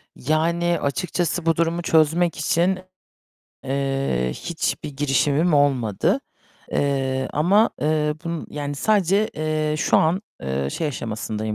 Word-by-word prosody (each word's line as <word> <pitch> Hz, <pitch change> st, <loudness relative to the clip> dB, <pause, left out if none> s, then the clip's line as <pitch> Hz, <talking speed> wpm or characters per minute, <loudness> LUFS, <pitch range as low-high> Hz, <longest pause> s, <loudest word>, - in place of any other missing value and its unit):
Yani, 170 Hz, +4 st, +1 dB
açıkçası 175 Hz, +3 st, -1 dB
bu 165 Hz, -1 st, +3 dB
durumu 170 Hz, +1 st, 0 dB
çözmek 165 Hz, +1 st, +2 dB
için, 175 Hz, +5 st, +1 dB, 0.9 s
eee, 135 Hz, -, -1 dB
hiçbir 160 Hz, -3 st, -3 dB
girişimim 145 Hz, +3 st, +2 dB
olmadı. 130 Hz, -8 st, +2 dB, 0.5 s
Eee, 135 Hz, -2 st, 0 dB
ama, 195 Hz, +9 st, +3 dB
eee, 150 Hz, 0 st, +1 dB
bunu 170 Hz, -1 st, -4 dB
yani 145 Hz, -1 st, -4 dB
sadece, 200 Hz, +4 st, +2 dB
eee, 155 Hz, -1 st, -1 dB
şu -, -, +3 dB
an, 170 Hz, +5 st, +2 dB, 0.2 s
eee, 70 Hz, 0 st, -2 dB
şey 160 Hz, -, -2 dB
aşamasındayım 110 Hz, -5 st, -4 dB
150 Hz, 115 wpm, -22 LUFS, 135-170 Hz, 0.9 s, bu